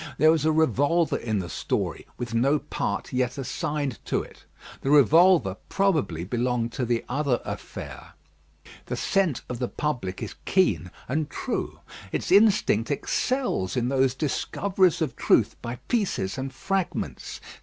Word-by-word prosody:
There 155 +3 +6
was 160 -2 +1
a 160 - +4
revolver 160 +2 +2
in 110 -3 -2
the 90 -3 -2
story, - - -3
with 120 -2 -5
no 135 +6 +3
part 145 -1 -3
yet 125 0 0
assigned 140 0 -3
to - - 0
it. - - -16 0.4
The 135 - -2
revolver, 150 - +5
probably, 155 - +1
belonged 120 +3 -1
to 125 - -2
the 120 -1 0
other 140 -2 0
affair. - - -7 0.7
The - - -2
scent 190 -9 +1
of 125 -1 -5
the 125 - -1
public 120 -13 -3
is - - -5
keen 185 - +2 0.2
and 150 +3 -1
true. - - -4 0.3
Its - - -2
instinct 200 - +4
excels 145 - -1
in 120 0 +1
those 135 -1 +2
discoveries 185 +4 +1
of 150 - -3
truth - - +3
by 120 +1 -4
pieces 200 - 0
and 135 0 -4
fragments. 190 +6 -3
135 Hz, 145 wpm, -26 LUFS, 120-165 Hz, 0.7 s, There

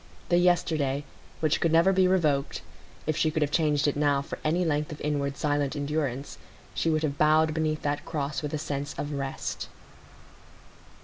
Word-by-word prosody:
The 175 - +4
yesterday, 160 -6 +2 0.4
which 155 -2 +1
could 165 - +2
never 170 +4 +5
be 185 -1 +4
revoked,—if 155 -2 -1
she 155 0 +2
could 155 0 0
have 145 - -2
changed 150 -3 +2
it 145 - +1
now 145 -1 +2
for - - -7
any 170 +4 +1
length 150 -1 0
of 150 - -7
inward 140 -2 -1
silent 145 -1 0
endurance, 145 -2 -3 0.3
she 165 - 0
would 155 0 +1
have 140 -2 -2
bowed 155 +1 +4
beneath 155 -1 -1
that 145 0 -1
cross 145 -2 -3
with 150 0 -3
a - - -1
sense 145 -2 -4
of 145 +1 -3
rest. 135 -2 -4
150 Hz, 175 wpm, -27 LUFS, 145-160 Hz, 0.4 s, never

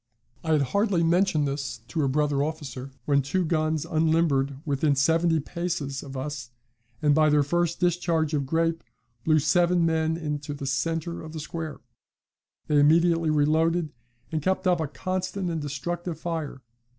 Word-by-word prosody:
I 160 -1 +1
had 150 -2 +3
hardly 195 - +1
mentioned 165 -3 +2
this 135 -4 -4
to 155 - -1
a 140 - +2
brother 145 0 +1
officer 140 -4 -5 0.2
when 140 -1 +3
two 180 +7 -1
guns 155 -1 0
unlimbered 155 -5 +1
within 145 0 +1
seventy 165 +3 +3
paces 155 -4 -3
of 135 -2 -8
us, 135 -2 -5 0.5
and, 150 -1 +5
by 155 0 +4
their 150 -1 +4
first 170 +3 0
discharge 170 -3 +1
of 140 -3 0
grape, 165 +2 0 0.4
blew 155 -1 +4
seven 175 +3 +3
men 160 0 +1
into 150 -2 -4
the 140 - -6
centre 165 +6 -2
of 160 0 -9
the 160 - -5
square. 160 0 -6 0.8
They 150 -1 +3
immediately 165 +2 +4
reloaded, 155 +2 +2 0.4
and 160 -1 -1
kept 185 +4 0
up 180 -2 +3
a 160 - -1
constant 185 +3 -3
and 165 -2 -2
destructive 165 +4 -4
fire. 160 -5 -4
155 Hz, 160 wpm, -26 LUFS, 145-170 Hz, 0.8 s, and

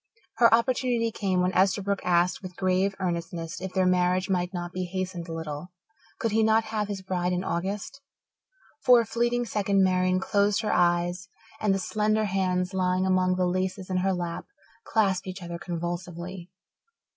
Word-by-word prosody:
Her 235 -1 +6
opportunity 235 0 +2
came 190 -4 0
when 180 +1 +1
Esterbrook 195 +2 +2
asked 175 0 +2
with 185 -2 -8
grave 190 +2 +1
earnestness 170 -2 -3
if 190 0 -4
their 185 0 +1
marriage 180 +1 +2
might 180 -1 0
not 175 -1 -5
be 185 0 -2
hastened 185 -1 -4
a - - -7
little 160 0 -5 0.5
could 230 - -1
he 220 +1 +3
not 220 +1 +4
have 210 -2 0
his 200 -2 -5
bride 180 -1 -1
in 180 +1 -1
August? 195 +10 -3 0.8
For 245 -2 +7
a - - -4
fleeting 240 +1 0
second 200 -2 +1
Marian 185 0 +2
closed 200 +2 +1
her 215 - 0
eyes 175 +1 +1 0.3
and 210 - +1
the 195 - +2
slender 215 +2 0
hands, 185 -1 0
lying 185 0 +1
among 185 -1 +2
the 185 0 +1
laces 185 +1 -2
in 185 - +1
her 190 +1 +1
lap, 175 -2 -4 0.4
clasped 195 -4 +1
each 185 0 -6
other 170 0 -6
convulsively. 175 +1 -5
185 Hz, 170 wpm, -27 LUFS, 180-200 Hz, 0.8 s, For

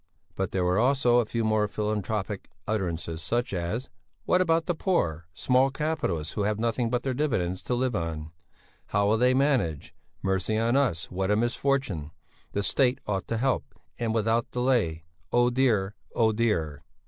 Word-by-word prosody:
But 95 -2 -2
there 95 -1 0
were 90 +3 +2
also 125 -1 +4
a 115 - 0
few 115 0 -1
more 110 -1 +2
philanthropic 105 -1 -3 0.2
utterances, 85 -6 -2
such 120 +6 -1
as: 95 +8 -2 0.4
"What 180 - +3
about 165 -2 +2
the 175 - 0
poor, 85 - 0
small 130 +10 +3
capitalists 135 - -2
who 105 - -2
have 105 +1 0
nothing 115 +1 0
but 125 0 -1
their 130 - -1
dividends 115 -11 -1
to 125 - -1
live 125 -1 0
on? 80 -4 -3 0.6
How'll 100 +2 +2
they 125 +3 +3
manage? 130 - +1 0.3
Mercy 95 +3 0
on 115 +3 +2
us, 125 -12 +1
what 95 +1 -1
a 105 - +4
misfortune! 120 - 0 0.4
The 100 - 0
State 130 +3 +2
ought 95 -2 -2
to 115 - -1
help, 130 +3 -1 0.2
and 115 -2 0
without 115 +1 +1
delay! 120 -11 +1 0.3
Oh 120 0 +4
dear! 115 -6 +2 0.2
Oh 110 -2 +4
dear!" 85 -10 0
110 Hz, 165 wpm, -27 LUFS, 95-125 Hz, 0.6 s, also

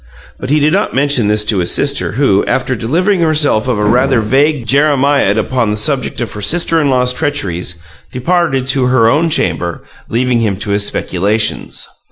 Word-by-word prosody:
But 130 - -6
he 150 +2 +2
did 150 +2 +1
not 200 -6 -1
mention 135 -5 +1
this 105 0 +1
to 105 -2 +1
his 85 - 0
sister, 140 0 0
who, 110 -6 +1
after 130 0 -1
delivering 175 - 0
herself 150 -8 +2
of 125 -4 0
a 105 - -1
rather 125 +4 +2
vague 135 +4 0
jeremiad 140 -4 +2
upon 115 +1 -1
the 105 - -2
subject 130 +3 -1
of 120 - -4
her 105 - -7
sister 165 +8 +2
in 145 - 0
law's 125 -1 +2
treacheries, 95 - -3 0.4
departed 135 -1 -1
to 135 -1 +1
her 125 -3 +3
own 155 +8 +2
chamber, 85 - -2 0.3
leaving 125 +1 0
him 105 -4 -1
to 100 +1 -4
his 100 0 +1
speculations. 105 +4 -2
125 Hz, 185 wpm, -13 LUFS, 105-145 Hz, 0.4 s, her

